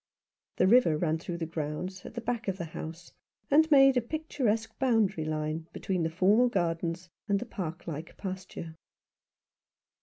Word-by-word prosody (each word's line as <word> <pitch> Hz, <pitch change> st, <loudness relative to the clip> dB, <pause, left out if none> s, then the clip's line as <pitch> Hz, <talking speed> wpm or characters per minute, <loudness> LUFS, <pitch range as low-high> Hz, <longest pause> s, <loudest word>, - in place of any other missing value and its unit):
The -, -, +4 dB
river 190 Hz, -7 st, +5 dB
ran 160 Hz, 0 st, 0 dB
through 170 Hz, +1 st, -5 dB
the 165 Hz, -, -2 dB
grounds, 165 Hz, +4 st, -4 dB
at -, -, -11 dB
the 235 Hz, -, -3 dB
back 235 Hz, -1 st, -3 dB
of 190 Hz, -1 st, -1 dB
the 175 Hz, -, -4 dB
house, 165 Hz, +1 st, -8 dB, 0.4 s
and 315 Hz, +3 st, +6 dB
made 270 Hz, -3 st, +7 dB
a -, -, +4 dB
picturesque 235 Hz, -5 st, -1 dB
boundary 215 Hz, -, +2 dB
line 155 Hz, +1 st, -2 dB
between 185 Hz, -2 st, -2 dB
the 165 Hz, -, +1 dB
formal 200 Hz, +9 st, +4 dB
gardens 170 Hz, -2 st, -1 dB, 0.2 s
and 200 Hz, -1 st, +2 dB
the 245 Hz, -, -5 dB
park 180 Hz, -8 st, -5 dB
like 160 Hz, 0 st, -6 dB
pasture. 185 Hz, -4 st, -6 dB
185 Hz, 160 wpm, -29 LUFS, 165-225 Hz, 0.4 s, made